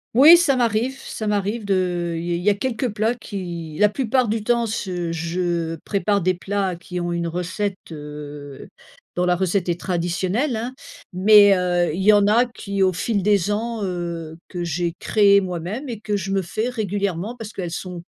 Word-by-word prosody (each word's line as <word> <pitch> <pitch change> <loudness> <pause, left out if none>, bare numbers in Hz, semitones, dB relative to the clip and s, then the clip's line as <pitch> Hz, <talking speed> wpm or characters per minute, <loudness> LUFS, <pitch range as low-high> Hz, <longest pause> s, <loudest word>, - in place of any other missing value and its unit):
Oui, 305 +7 +9
ça 330 -6 +3
m'arrive 240 +2 0
ça 220 -4 -6
m'arrive 210 +2 -1
de, 180 -3 0
heu, - - -3
il 165 - -4
y - - +1
il - - -5
y 200 - +3
a 205 - +3
quelques 245 +2 -2
plats 215 +3 0
qui 175 -9 -6
la 210 0 +5
plupart 255 +1 +1
du 215 0 -1
temps, 235 +1 +2
ce 185 -6 -3
je 170 0 -2
prépare 200 0 +1
des 185 +2 +2
plats 190 0 -2
qui 180 +1 -6
ont 175 0 -2
une 170 0 -1
recette, 185 +4 -3
heu, 150 -2 -9 0.5
dont 180 - +1
la 180 0 +3
recette 185 0 0
est 175 0 -1
traditionnelle, 185 - -1
hein, 235 +4 -4 0.4
mais, 205 +2 +7
heu, 175 -2 +1
il 185 - -3
y 210 - +6
en 205 -1 +5
a 230 +4 +4
qui, 200 -4 -4
au 185 - +4
fil 200 +3 -1
des 205 0 +2
ans, 225 +1 -2
heu, 170 -3 -4
que 175 -2 -5
j'ai 170 0 -1
créé 200 -2 +4
moi-même 185 - -4
et 230 -3 -5
que 210 -1 -2
je 195 0 -4
me 195 - +1
fais 215 +7 -2
régulièrement 200 -2 -2
parce 225 -3 -8
qu'elles 180 -3 -4
sont 180 0 -6
195 Hz, 200 wpm, -22 LUFS, 175-215 Hz, 0.5 s, Oui